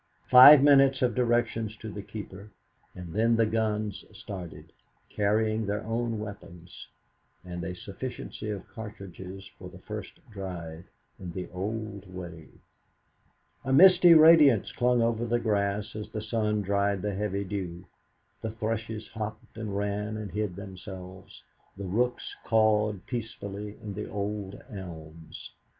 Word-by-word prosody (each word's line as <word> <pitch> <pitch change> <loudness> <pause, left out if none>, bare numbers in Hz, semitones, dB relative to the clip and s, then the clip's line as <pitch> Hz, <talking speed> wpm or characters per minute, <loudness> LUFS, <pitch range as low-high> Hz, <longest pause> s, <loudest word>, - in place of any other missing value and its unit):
Five 130 +3 +11
minutes 135 -2 +5
of 120 -2 +2
directions 115 -3 0
to 110 0 -7
the 105 - -6
keeper, 100 0 -9 0.5
and 90 -2 -8
then 115 +2 +3
the 115 0 +3
guns 110 -2 -1
started, 85 -5 -9 0.4
carrying 110 +1 +1
their 105 +1 -2
own 115 0 -1
weapons 100 -5 -9 0.6
and 90 -1 -6
a 90 - -4
sufficiency 105 +3 -7
of 100 -2 -5
cartridges 95 -3 -9
for 90 - -9
the 90 - -13
first 105 +2 -7 0.2
drive 85 -5 -7 0.3
in 90 -3 -7
the 90 0 -5
old 100 0 -5
way. 85 -3 -8 1.2
A 130 - -2
misty 175 +3 +8
radiance 155 - +7
clung 125 -1 +2
over 115 0 0
the 120 0 +1
grass 105 -2 -1
as 105 0 -6
the 110 -1 -5
sun 105 -1 0
dried 100 0 0
the 105 -1 -1
heavy 100 0 -2
dew; 90 -2 -5 0.6
the 110 - -3
thrushes 110 0 -4
hopped 110 -1 -7
and 110 -3 -4
ran 105 +1 -2
and 105 -3 -6
hid 105 -1 -2
themselves, 95 -1 -10 0.3
the 100 - -5
rooks 120 +7 -1
cawed 105 -3 +2
peacefully 105 -3 -6
in 105 -1 -5
the 105 +2 -6
old 100 -1 -4
elms. 80 - -10
105 Hz, 135 wpm, -28 LUFS, 95-110 Hz, 1.2 s, Five